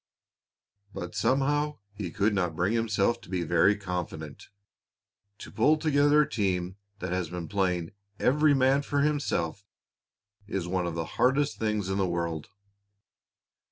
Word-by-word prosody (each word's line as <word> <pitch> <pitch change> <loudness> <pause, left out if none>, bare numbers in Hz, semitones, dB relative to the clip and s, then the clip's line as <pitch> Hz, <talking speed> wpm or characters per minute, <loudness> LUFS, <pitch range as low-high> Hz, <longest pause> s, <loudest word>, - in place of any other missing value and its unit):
But 90 0 -5
somehow 145 +2 +1 0.2
he 100 -3 -5
could 100 +5 +1
not 90 -5 0
bring 90 +6 +1
himself 115 0 +1
to - - -15
be 90 -2 -1
very 85 +5 +4
confident. 90 -6 -5 0.9
To - - -10
pull 150 +8 +3
together 150 -1 +4
a - - -5
team 95 -4 -1 0.2
that 90 -3 -5
has 90 -3 -1
been 90 -1 -5
playing 90 -5 -1 0.3
"every 150 +2 +4
man 135 +1 +3
for 145 0 -1
himself" 140 - -1 0.8
is 95 -5 -3
one 90 -1 -1
of 85 - -4
the 80 -1 -2 0.2
hardest 140 +3 +2
things 105 -3 -1
in 95 +1 -1
the 95 - +2
world. 85 -2 -3
100 Hz, 145 wpm, -28 LUFS, 90-135 Hz, 0.9 s, very